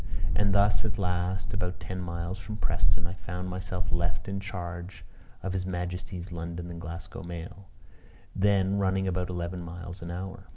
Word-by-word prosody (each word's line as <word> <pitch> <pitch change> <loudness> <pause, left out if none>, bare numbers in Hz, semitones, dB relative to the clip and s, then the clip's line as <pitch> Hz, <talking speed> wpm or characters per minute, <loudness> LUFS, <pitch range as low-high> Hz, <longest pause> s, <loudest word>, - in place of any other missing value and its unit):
And 100 +7 +4
thus 100 +1 +6
at 110 0 0
last, 90 0 +1
about 90 -2 0
ten 90 +2 -3
miles 85 +2 -2
from 105 +1 -4
Preston, 85 - +3
I 85 - -2
found 90 -1 -3
myself 90 -3 -2
left 85 +1 +1
in 100 0 0
charge 90 -2 -4 0.4
of 95 - 0
his 95 -1 0
Majesty's 90 0 -2
London 85 +1 -3
and 85 0 -5
Glasgow 85 +1 -5
mail, 85 +3 -6 0.7
then 100 0 +5
running 95 0 +3
about 90 0 +1
eleven 90 0 -1
miles 85 +1 -5
an 85 - -4
hour. 95 +2 -4
90 Hz, 165 wpm, -31 LUFS, 85-95 Hz, 0.7 s, thus